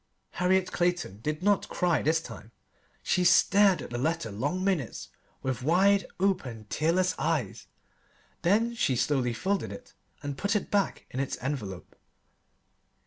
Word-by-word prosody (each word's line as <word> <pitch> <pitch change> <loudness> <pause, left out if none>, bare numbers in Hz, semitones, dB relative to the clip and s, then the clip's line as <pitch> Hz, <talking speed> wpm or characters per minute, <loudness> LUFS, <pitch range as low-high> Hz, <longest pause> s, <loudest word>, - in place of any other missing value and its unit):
Harriet 185 +1 +1
Clayton 175 - -1
did 150 +7 -3
not 205 -1 +2
cry 175 -6 +1
this 160 +2 +2
time. 115 -8 -11 0.5
She 180 - +1
stared 200 +1 +5
at - - -9
the 120 - -3
letter 160 -4 -1
long 145 - -2
minutes 175 - -2 0.3
with 130 -2 -2
wide 195 +7 +3
open, 140 - -1
tearless 175 +4 +2
eyes, 135 - -2 0.7
then 215 +7 +2
she 185 - +1
slowly 125 0 +1
folded 195 - -1
it 250 +1 -11 0.3
and 145 -1 -5
put 200 +2 0
it 210 - -2
back 200 -1 0
in 130 - -4
its 135 - -2
envelope. 115 -9 -5
165 Hz, 140 wpm, -28 LUFS, 130-190 Hz, 0.7 s, stared